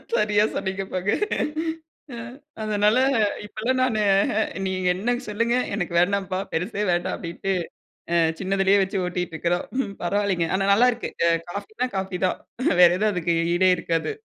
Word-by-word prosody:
சரியா 210 0 +3
சொன்னீங்க 195 0 -2
போங்க. 185 +2 0 1.0
அ. - - -7 0.5
அதனால, 210 +1 +2 0.5
இப்பலாம் 240 +5 -2
நானு 225 -4 +1 0.4
அ - - +3 0.2
நீங்க 185 -1 -1
என்ன 240 +6 0
சொல்லுங்க, 230 +3 +1 0.2
எனக்கு 180 -4 -3
வேண்டாம்பா 190 0 0
பெருசே 190 +5 -2
வேண்டாம் 175 0 0
அப்படின்ட்டு 180 +3 -3 0.6
அ - - +3 0.2
சின்னதிலேயே 195 +1 +2
வச்சு 195 +2 -3
ஓட்டிட்டுருக்கிறோம். 175 -1 -2 0.4
பரவாயில்லைங்க. 195 -2 0
ஆனா 195 - 0
நல்லா 245 +5 +5
இருக்கு. 235 0 -5 0.4
காஃபினா 215 +5 -3
காஃபி 190 -1 -3
தான், 185 - 0 0.4
வேற 175 - +9
எதும் 215 0 +2
அதக்கு 170 -2 0 0.2
ஈடே 185 +1 +4
இருக்காது. 165 - -1
195 Hz, 135 wpm, -24 LUFS, 180-210 Hz, 1.0 s, வேற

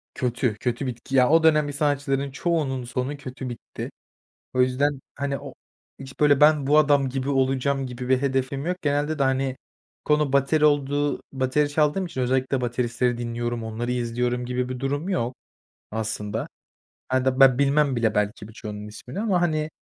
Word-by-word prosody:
kötü 125 -2 0
kötü 125 +2 -2
bitti 125 +2 -5
ya, 125 -1 +5
o 160 +1 +5
dönem 150 -2 +4
bir 145 - -5
sanatçıların 140 -1 0
çoğunun 135 -4 -1
sonu 125 +4 -3
kötü 130 -2 -7
bitti. 120 - -7 0.6
O 130 - +2
yüzden, 135 +2 +1
hani, 140 -1 -2
o 140 -2 -10 0.4
hiç 135 +1 -11
böyle 145 -2 +5
ben 150 -2 +5
bu 150 +2 +5
adam 145 -3 +4
gibi 130 +1 -3
olacağım 135 0 +1
gibi 125 0 -6
bir 130 +1 +3
hedefim 135 +1 -1
yok. 180 +1 0
Genelde 145 +1 0
de, - - +2
hani, 135 0 +1 0.5
konu 150 -2 +2
bateri 140 +3 +3
olduğu 145 0 +2
bateri 135 +3 +1
çaldığım 150 +5 +1
için 130 -6 -5
özellikle 130 +1 +1
bateristleri 120 0 0
dinliyorum, 120 0 -3
onları 115 +2 -3
izliyorum 125 0 -1
gibi 125 0 -2
bir 130 -1 -5
durum 145 +6 -2
yok 125 -8 -1 0.6
aslında. 110 0 -3 0.6
A 130 0 +1
da 130 0 +1
ben 130 -2 +7
bilmem 140 -1 +3
bile 110 -2 +1
belki 105 +1 -1
birçoğunun 105 -2 -8
ismini 125 - -8
ama, 200 -5 +1
hani, 155 -2 0
135 Hz, 170 wpm, -24 LUFS, 125-145 Hz, 0.6 s, ben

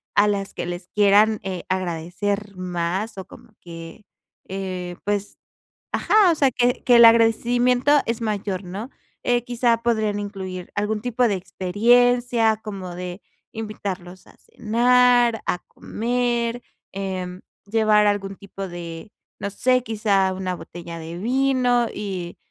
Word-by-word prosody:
a 205 +1 +5
las 200 -1 -2
que - - -3
les 175 0 -6
quieran, 210 +1 +4
eh, 185 -2 -5
agradecer 185 +3 -2
más, 185 +3 -3
o 190 - -7
como 230 -2 -16
que, 165 +4 -10 0.4
eh, 185 -2 -5
pues, 205 0 -2 0.5
ajá, 425 -4 +4
o - - +1
sea 275 -3 +3
que 245 0 +1
que 245 -1 +6
el 235 - +9
agradecimiento 240 +3 +4
es 230 0 -2
mayor, 205 -3 -2
¿no? 200 +8 -7 0.4
Eh, 240 -1 +2
quizá 240 -1 +1
podrían 220 -3 +1
incluir 190 -3 -6
algún 210 +1 -1
tipo 245 +1 +1
de 210 - 0
experiencia, 225 +5 +2
como 190 -4 -6
de 180 +1 -6 0.3
invitarlos 195 -5 -6
a - - -19
cenar, 240 +1 +3
a 180 - 0
comer, 240 0 -2 0.3
em, 185 -2 -4 0.2
llevar 215 0 +3
algún 195 -1 -1
tipo 195 0 -8
de, 175 +2 -8 0.3
no 200 - -3
sé, 255 +5 +2
quizá 205 -4 +1
una 185 -1 -3
botella 170 -1 -9
de 165 +2 -7
vino 250 +1 +2
y 185 -4 -5
205 Hz, 135 wpm, -23 LUFS, 185-235 Hz, 0.5 s, el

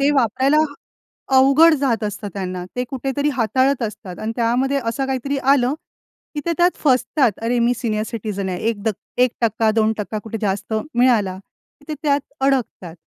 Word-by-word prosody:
ते 280 +1 +3
वापरायला 265 +3 +2 0.8
अवघड 275 +5 +6
जात 250 -6 0
असतं 205 0 -4
त्यांना. 185 -2 -4
ते 250 - -1
कुठेतरी 275 +2 -1
हाताळत 260 +3 +1
असतात 210 -4 -6
आणि 220 +1 -3
त्यामध्ये 255 +4 +1
असं 230 +4 -1
काहीतरी 270 +1 -2
आलं, 270 -1 +3 0.6
की 295 - -2
ते 340 - +1
त्यात 350 +1 +3
फसतात. 260 -2 +3
अरे, 240 +1 0
मी 240 +1 +3
सीनियर 215 -3 -1
सिटिझन 205 -4 -4
आहे. 180 - -3
1% 225 +1 0
2% 215 -1 0
कुठे 225 0 -5
जास्त 200 +2 -2 0.2
मिळाला 225 -7 +3 0.5
ते 305 - -3
त्यात 285 -2 +2 0.2
अडकतात. 250 -11 -1
240 Hz, 145 wpm, -20 LUFS, 215-270 Hz, 0.8 s, अवघड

